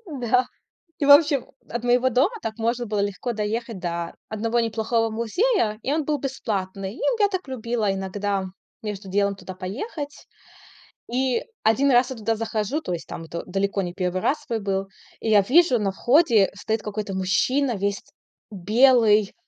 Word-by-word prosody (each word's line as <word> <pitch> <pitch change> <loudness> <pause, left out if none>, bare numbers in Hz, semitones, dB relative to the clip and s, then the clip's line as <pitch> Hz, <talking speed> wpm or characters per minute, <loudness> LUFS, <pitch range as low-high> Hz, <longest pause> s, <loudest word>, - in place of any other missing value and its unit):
Да. 250 -4 +1 0.5
И 290 - 0
в 285 - +4
общем, 290 -2 +6 0.2
от 235 +1 -4
моего 245 +1 +3
дома 260 - +3
так 220 0 -4
можно 235 +2 -1
было 210 -1 -1
легко 200 +4 -2
доехать 220 0 -3
до 170 -1 -4
одного 230 +2 0
неплохого 225 0 0
музея. 230 - 0
И 275 - -1
он 310 0 0
был 295 0 0
бесплатный. 200 -7 -4
И - - -12 0.2
я 405 - +5
так 375 -6 -4
любила 230 -5 -1
иногда 195 0 -2 0.4
между 205 -2 -5
делом 200 +1 +1
туда 185 -1 -9
поехать. 280 - -6 0.9
И. 255 0 +1 0.2
Один 260 +6 +3
раз 250 +1 +4
я 260 - -5
туда 225 +1 -1
захожу, 225 +6 -2
то 180 - -5
есть, 170 - -5
там, 165 - -7
это 170 +1 -6
далеко 195 +1 -1
не 175 -1 -4
1 185 0 -2
свой 230 -6 -4
был. 195 -1 -1 0.3
И - - -4
я 210 - +7
вижу 255 - +4
на 200 - 0
входе 235 - +4
стоит 220 +2 -2
какой-то 210 -1 -4
мужчина 235 +8 +1
весь 200 0 -1 0.5
белый, 215 +1 +4
220 Hz, 165 wpm, -24 LUFS, 200-255 Hz, 0.9 s, я